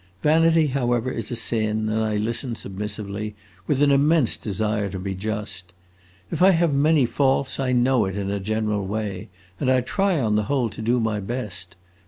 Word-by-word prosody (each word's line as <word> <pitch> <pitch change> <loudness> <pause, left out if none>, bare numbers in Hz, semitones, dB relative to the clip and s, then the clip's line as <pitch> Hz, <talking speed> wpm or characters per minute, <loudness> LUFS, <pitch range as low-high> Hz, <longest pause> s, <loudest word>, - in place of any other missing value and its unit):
Vanity, 165 +1 +4
however, 125 -3 0
is 115 -3 -5
a 120 - -3
sin, 110 -2 0
and 110 +1 0
I 110 -1 0
listen 115 +3 -2
submissively, 105 +1 -5 0.3
with 145 0 +2
an 145 - +4
immense 145 -1 +4
desire 105 0 -2
to 95 - -5
be 95 +1 -4
just. 95 -3 -5 0.6
If - - -3
I 190 - +7
have 170 -4 +3
many 145 0 +4
faults 135 +1 0
I 130 -1 0
know 125 -2 +3
it, 95 +1 -4
in 100 -1 -2
a 100 - -2
general 105 0 -1
way, 105 -1 -4 0.3
and 130 - 0
I 130 -1 +4
try 195 +6 0
on 110 -4 +1
the 105 - 0
whole 130 -5 +1
to 110 - -9
do 120 +3 +1
my 110 -2 -1
best. 100 -5 -5
110 Hz, 190 wpm, -23 LUFS, 105-135 Hz, 0.6 s, I